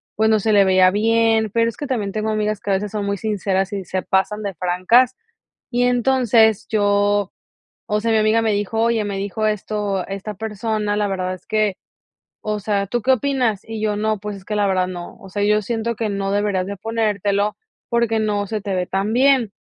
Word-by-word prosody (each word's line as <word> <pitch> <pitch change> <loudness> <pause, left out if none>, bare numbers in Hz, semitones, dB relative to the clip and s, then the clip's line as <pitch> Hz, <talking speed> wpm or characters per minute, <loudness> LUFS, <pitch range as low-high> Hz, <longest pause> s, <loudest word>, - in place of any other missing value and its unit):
pues 220 +1 +2
no 215 -1 +4
se 215 +1 +1
le 200 - +6
veía 185 -1 +5
bien, 225 +1 +2
pero 230 0 +2
es 230 - -8
que 290 - -5
también 215 -7 -2
tengo 215 +1 -2
amigas 215 -1 -1
que 205 - -7
a 195 - +3
veces 200 +1 -3
son 210 -2 -3
muy 200 0 -1
sinceras 195 -1 -1
y 195 -1 -3
se 185 +1 -3
pasan 200 +3 0
de 200 -1 -3
francas. 185 +9 +2 0.5
Y 245 0 +1
entonces 240 -3 +3
yo, 205 -1 +1 0.6
o 210 0 +1
sea, 225 +1 0
mi 220 - +3
amiga 215 +1 +3
me 225 -1 +1
dijo: 205 +2 -1
"Oye, 230 -2 +1
me 200 -1 -3
dijo 200 +2 -2
esto, 205 -2 -2
esta 195 +2 -5
persona, 215 0 -2
la 210 -1 0
verdad 185 -1 -2
es 180 - -11
que, 215 -3 0 0.7
o 210 -1 -2
sea, 200 0 -1
¿tú 240 +3 -2
qué 260 - +3
opinas?" 255 -6 0
Y 225 -1 -6
yo: 210 -1 0
"No, 215 0 0
pues 205 0 -6
es 190 - -13
que 210 +1 -3
la 205 - +2
verdad 185 -1 +1
no. 175 -1 -7
O 195 - -12
sea, 205 +2 -3
yo 210 +1 +3
siento 230 +2 -2
que 220 -1 -2
no 195 -1 -2
deberías 200 -2 0
de 200 +1 -5
ponértelo 210 -1 -1 0.3
porque 235 -2 +1
no 205 -2 0
se 215 +1 -3
te 200 -2 -3
ve 180 -1 -1
tan 195 +3 -1
bien". 255 -4 +3
210 Hz, 220 wpm, -20 LUFS, 200-225 Hz, 0.7 s, le